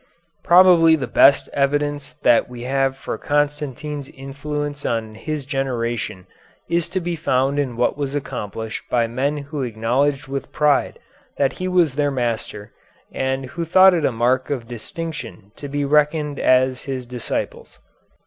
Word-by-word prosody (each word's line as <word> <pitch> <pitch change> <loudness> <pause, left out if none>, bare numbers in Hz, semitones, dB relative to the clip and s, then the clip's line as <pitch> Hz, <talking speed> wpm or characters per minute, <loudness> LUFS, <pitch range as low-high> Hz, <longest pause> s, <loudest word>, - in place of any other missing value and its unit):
Probably 175 -2 +6
the 140 -5 -3
best 140 +1 +5
evidence 145 +1 0
that 120 - +4
we 120 -1 -8
have 135 +1 0
for - - -5
Constantine's 145 -1 -2
influence 145 +2 -5
on 110 -2 -2
his 145 +5 -5
generation 120 -8 -3 0.4
is 170 -1 0
to 185 - -1
be 175 -1 -3
found 135 -1 0
in 130 -5 -2
what 125 +4 0
was 140 0 -2
accomplished 110 -5 -5
by 120 -1 +2
men 130 +6 -1
who 145 0 -5
acknowledged 130 +5 0
with 135 0 -5
pride 150 -2 +1 0.4
that 140 - +1
he 185 - -4
was 175 -6 +2
their 145 +1 +1
master, 115 -5 -3 0.4
and 130 0 -2
who 170 +6 -5
thought 185 +3 +6
it 165 -3 0
a - - +2
mark 125 +3 +1
of 125 -5 -3
distinction 120 - -7
to 145 - -7
be 145 +1 -2
reckoned 150 0 +1
as 130 0 +2
his 130 -2 -4
disciples. 120 -1 -5
140 Hz, 150 wpm, -21 LUFS, 125-150 Hz, 0.4 s, Probably